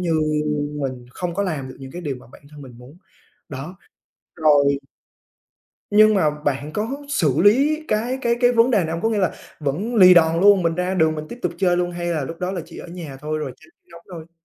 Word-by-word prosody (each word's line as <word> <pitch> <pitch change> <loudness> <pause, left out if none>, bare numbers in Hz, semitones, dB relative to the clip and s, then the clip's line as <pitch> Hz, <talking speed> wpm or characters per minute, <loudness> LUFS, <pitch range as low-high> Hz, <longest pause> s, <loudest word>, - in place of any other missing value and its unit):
như 170 -2 -1 0.7
mình 130 -2 -4
không 175 +4 -5
có 200 - 0
làm 150 -8 -3
được - - -11
những 135 -1 -10
cái 175 - -7
điều 140 -5 -3
mà 125 - -16
bản - - -16
thân 150 -1 -12
mình 120 -3 -13
muốn. 130 +6 -15 0.5
Đó, 150 +7 -8 0.6
rồi 145 -3 +3 1.1
nhưng 215 +1 +6
mà 155 -6 +3
bạn 145 0 -3
có 210 +5 -2 0.2
xử 160 - +1
lý 285 +9 +3
cái 235 +5 -1
cái 235 0 +2
cái 245 0 +4
vấn 235 +2 +4
đề 215 - +3
này 160 - -3
hông? 165 - -3
Có 225 - +2
nghĩa 215 -2 0
là 185 -4 +1 0.3
vẫn 175 - -2
lì 185 -4 +8
đòn 165 0 +4
luôn, 200 -2 +6
mình 165 -1 +1
ra 180 +2 -1
đường 160 -3 +2
mình 155 0 -6
tiếp 240 - -9
tục 175 -1 -1
chơi 180 -2 +2
luôn 175 0 0
hay 175 0 -5
là 160 -5 -1
lúc 165 +4 -7
đó 180 +1 -2
là 180 - -3
chỉ - - -12
ở - - -9
nhà 165 -6 -8
thôi 155 +1 -3
rồi 150 - -5
tránh 345 - -21 0.2
nóng 170 - -13
thôi? 165 -1 -10
170 Hz, 235 wpm, -21 LUFS, 150-200 Hz, 1.1 s, lì